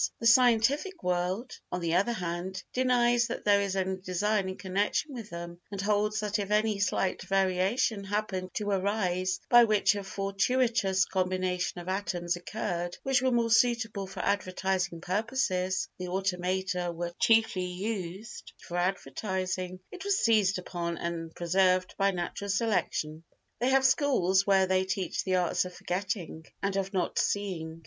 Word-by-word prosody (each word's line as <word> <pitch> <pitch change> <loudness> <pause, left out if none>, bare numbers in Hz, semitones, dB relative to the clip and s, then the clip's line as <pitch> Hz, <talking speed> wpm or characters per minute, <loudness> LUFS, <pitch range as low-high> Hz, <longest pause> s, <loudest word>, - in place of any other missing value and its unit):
The 230 - -5
scientific 255 - +4
world, 180 +7 -2
on 180 - -2
the 170 -1 -1
other 195 +7 +3
hand, 180 -1 -4
denies 240 -2 +3
that 235 - -5
there 205 -1 +5
is 195 -1 -2
any 190 0 -1
design 190 +2 0
in 185 - -6
connection 200 +10 -1
with 230 -4 -7
them, 170 -1 -7
and 200 - -5
holds 210 +1 +1
that 210 0 -1
if 200 -1 -3
any 210 0 +2
slight 195 -2 0
variation 195 +3 +1
happened 195 -2 -2
to 205 -1 -1
arise 185 -2 0
by 240 0 +8
which 215 -2 +3
a 200 -1 -4
fortuitous 195 +1 +1
combination 185 -1 -1
of 175 - -12
atoms 180 -2 -1
occurred 175 -1 -4
which 270 -1 +2
was 260 0 +2
more 235 -1 +1
suitable 225 -3 +2
for - - -6
advertising 185 -3 -1
purposes 190 -2 0
(the 180 - -4
automata 180 -1 -1
were 170 +1 -4
chiefly 225 -5 +3
used 190 +2 -5
for 175 - -6
advertising) 185 +1 -2
it 380 0 -8
was 400 -1 +2
seized 210 - +3
upon 170 -2 -4
and 165 -1 -4
preserved 185 +1 +2
by 195 0 +4
natural 195 +2 -4
selection. 190 -7 -1 0.4
They 245 +3 +2
have 265 0 +4
schools 195 - +3
where 195 -1 +5
they 185 0 +2
teach 190 -1 -2
the 185 -1 0
arts 180 -2 +1
of 180 0 -8
forgetting 180 -3 -4 0.2
and 195 0 0
of 195 0 -1
not 190 -3 -1
seeing. 165 -5 -2
190 Hz, 155 wpm, -29 LUFS, 180-215 Hz, 0.4 s, by